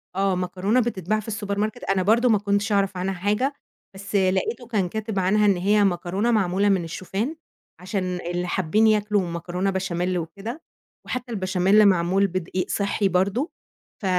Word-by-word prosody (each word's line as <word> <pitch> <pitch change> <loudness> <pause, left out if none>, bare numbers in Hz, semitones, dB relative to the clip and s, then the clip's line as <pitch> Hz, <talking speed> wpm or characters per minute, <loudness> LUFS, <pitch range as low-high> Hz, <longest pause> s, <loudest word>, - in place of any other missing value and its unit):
آه، 195 -1 +1
مكرونة 185 +6 0
بتتباع 215 -3 -1
في 215 +1 -6
الSupermarket، 205 0 -3
أنا 190 -1 +1
برضه 235 +5 +3
ما 215 - +5
كنتش 200 +1 0
أعرف 195 -2 +1
عنها 190 +2 -1
حاجة، 210 +9 0 0.4
بس 195 +2 -7
لقيته 195 +5 +1
كان 205 -6 0
كاتب 220 0 -3
عنها 210 +3 +3
إن 200 -3 +4
هي 205 +3 +3
مكرونة 190 +4 0
معمولة 200 -2 +2
من 190 -3 +2
الشوفان، 190 - -4 0.5
عشان 190 +1 -2 0.2
اللي 175 +1 -2
حابين 190 +5 +2
ياكلوا 210 -1 +2
مكرونة 175 +3 -2
بشاميل 185 -1 -1
وكده، 200 - -6 0.4
وحتى 250 -1 -4
البشاميل 190 0 +3
معمول 190 +1 +3
بدقيق 185 0 -3
صحّي 200 0 0
برضه، 200 - 0 0.5
ف - - -5
195 Hz, 155 wpm, -24 LUFS, 185-215 Hz, 0.5 s, ما